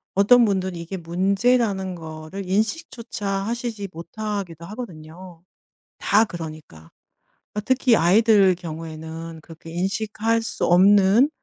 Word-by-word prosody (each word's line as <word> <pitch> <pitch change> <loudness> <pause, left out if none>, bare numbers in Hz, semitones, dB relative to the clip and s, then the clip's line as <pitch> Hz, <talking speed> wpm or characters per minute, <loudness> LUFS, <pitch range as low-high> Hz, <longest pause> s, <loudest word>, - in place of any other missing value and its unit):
어떤 235 +4 +6
분들이 190 -3 -1
이게 170 +3 -6
문제라는 190 +3 0
거를 160 +3 -8
인식조차 220 - -2
하시지 210 +1 -3
못하기도 180 0 -6
하거든요. 175 -4 -10 0.6
다 210 +2 +3
그러니까. 155 - -9 0.6
어 210 - -1
특히 255 0 +3
아이들 195 +1 +5
경우에는 160 -1 -8
그렇게 165 0 -12
인식할 215 +5 -1
수 225 - -3
없는 200 +7 +5
190 Hz, 275 characters per minute, -23 LUFS, 165-215 Hz, 0.6 s, 어떤